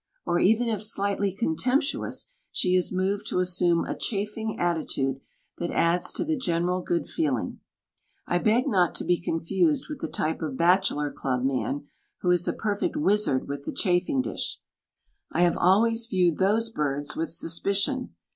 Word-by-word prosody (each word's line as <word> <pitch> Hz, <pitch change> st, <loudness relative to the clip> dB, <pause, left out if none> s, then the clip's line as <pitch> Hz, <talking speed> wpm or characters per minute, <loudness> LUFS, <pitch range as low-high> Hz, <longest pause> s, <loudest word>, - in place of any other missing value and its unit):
Or 175 Hz, -, +1 dB
even 225 Hz, +6 st, +3 dB
if 215 Hz, -3 st, -1 dB
slightly 200 Hz, -2 st, 0 dB
contemptuous 250 Hz, -, -1 dB, 0.2 s
she 180 Hz, -, +1 dB
is 185 Hz, -1 st, +2 dB
moved 190 Hz, +2 st, -1 dB
to -, -, -1 dB
assume 180 Hz, -2 st, +3 dB
a -, -, -3 dB
chaffing 215 Hz, +1 st, -3 dB
attitude 140 Hz, -6 st, -1 dB, 0.4 s
that 175 Hz, -, -2 dB
adds 170 Hz, +1 st, +1 dB
to -, -, 0 dB
the 320 Hz, 0 st, 0 dB
general 180 Hz, -, 0 dB
good 175 Hz, -1 st, -1 dB
feeling. 130 Hz, -, -2 dB, 0.7 s
I 175 Hz, -, +1 dB
beg 225 Hz, +6 st, +2 dB
not 180 Hz, -4 st, +2 dB
to -, -, -3 dB
be 175 Hz, -1 st, +1 dB
confused 195 Hz, -, 0 dB
with 300 Hz, -, -6 dB
the -, -, -2 dB
type 160 Hz, +2 st, -2 dB
of 150 Hz, -5 st, -3 dB
bachelor 170 Hz, -4 st, +2 dB
club 130 Hz, -2 st, -2 dB
man 135 Hz, +2 st, -1 dB, 0.4 s
who 180 Hz, -, +2 dB
is 175 Hz, -1 st, +2 dB
a -, -, +1 dB
perfect 205 Hz, +3 st, -2 dB
wizard 210 Hz, -, +2 dB
with 140 Hz, 0 st, -4 dB
the -, -, -3 dB
chafing 185 Hz, +8 st, +1 dB
dish. -, -, -4 dB, 0.7 s
I -, -, 0 dB
have 175 Hz, -1 st, +4 dB
always 225 Hz, +5 st, +3 dB
viewed 180 Hz, -6 st, +1 dB
those 220 Hz, +4 st, +3 dB
birds 145 Hz, -5 st, -2 dB
with 165 Hz, -, -2 dB
suspicion. 200 Hz, -, -1 dB
180 Hz, 165 wpm, -26 LUFS, 165-215 Hz, 0.7 s, have